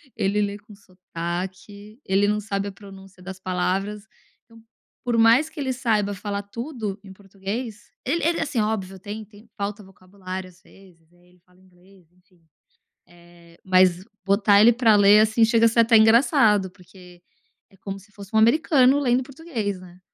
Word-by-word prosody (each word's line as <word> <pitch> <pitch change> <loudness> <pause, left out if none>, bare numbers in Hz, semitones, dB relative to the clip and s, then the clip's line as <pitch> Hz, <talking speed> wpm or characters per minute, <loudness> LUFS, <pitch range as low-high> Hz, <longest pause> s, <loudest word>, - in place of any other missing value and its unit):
Ele 200 +2 0
lê 205 0 -2
com 210 0 -17
sotaque, 190 +3 -8
ele 195 +2 +2
não 210 +1 0
sabe 200 -1 -4
a - - -9
pronúncia 195 -2 -15
das 190 0 -9
palavras, 190 +3 -3 0.4
então 230 -1 -19 0.4
por 240 -2 -1
mais 230 +7 +4
que - - -12
ele 265 -2 -2
saiba 220 -5 0
falar 200 +1 -5
tudo 220 -1 -6
em 190 -1 -12
português 200 +3 -7 0.2
ele 330 +6 -1
ele, 335 +1 +1
assim, 285 -6 -2
óbvio 195 -3 -3
tem 210 +3 -7
tem 210 +2 -19
falta 205 0 -4
vocabulário 185 0 -9
às 180 +1 -23
vezes, 175 -5 -22
aí 175 0 -27
ele 180 0 -27
fala 180 0 -27
inglês 185 -1 -24
enfim. 180 -1 -32 0.7
Eh, 170 -1 -20
mas 185 -1 +3 0.2
botar 200 +1 +4
ele 230 +3 +7
pra 225 -2 +3
ler, 205 +1 +6
assim, 220 +1 +2
chega 230 0 +3
a - - +2
ser 230 - -1
até 230 0 +5
engraçado, 220 - +4
porque 180 -1 -18 0.5
é - - -23
como 195 0 -7
se 200 +2 -22
fosse 200 0 -13
um - - +5
americano 260 +2 +4
lendo 255 -2 +1
português, 250 - -5
né. 180 0 -15
200 Hz, 175 wpm, -23 LUFS, 185-225 Hz, 0.7 s, ele